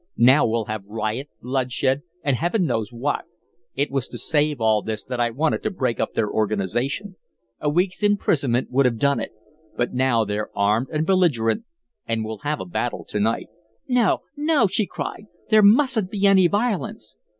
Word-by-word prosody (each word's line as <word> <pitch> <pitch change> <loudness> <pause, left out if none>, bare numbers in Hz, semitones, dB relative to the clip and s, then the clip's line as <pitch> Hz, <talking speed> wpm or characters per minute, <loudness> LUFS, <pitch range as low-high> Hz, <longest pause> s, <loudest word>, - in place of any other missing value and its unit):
Now 130 +4 +6
we'll 115 0 0
have 110 -1 -4
riot, 110 +6 -3
bloodshed, 130 +1 0 0.2
and 140 -3 +2
Heaven 175 - 0
knows 115 -6 -1
what. 125 +5 -2 0.5
It 140 +1 -1
was 135 -2 -1
to 120 - -8
save 150 +3 +1
all 110 -2 +3
this 110 0 -5
that 125 -1 -4
I 120 -1 +2
wanted 150 +7 0
to - - -1
break 130 - -2
up - - -2
their 105 - +1
organization. 110 - -2 0.4
A 150 - 0
week's 180 +6 0
imprisonment 145 - +1
would 135 +1 +4
have 115 -2 -1
done 140 +2 +2
it, 110 - -4 0.5
but 120 - -1
now 125 -3 +2
they're 105 +1 -3
armed 105 +5 +2
and 155 0 0
belligerent 175 - +2 0.4
and 115 -1 -1
we'll 110 -1 -6
have 150 +4 -2
a - - -5
battle 90 - -3
to 105 - -2
night." 110 +3 0 0.4
"No, 245 -5 +2
no!" 300 -1 +2
she 195 +1 0
cried. 210 - -6 0.3
"There 215 0 +7
mustn't 220 -1 +4
be 200 -1 -1
any 190 -2 +6
violence." 200 - -2
135 Hz, 180 wpm, -23 LUFS, 115-185 Hz, 0.5 s, There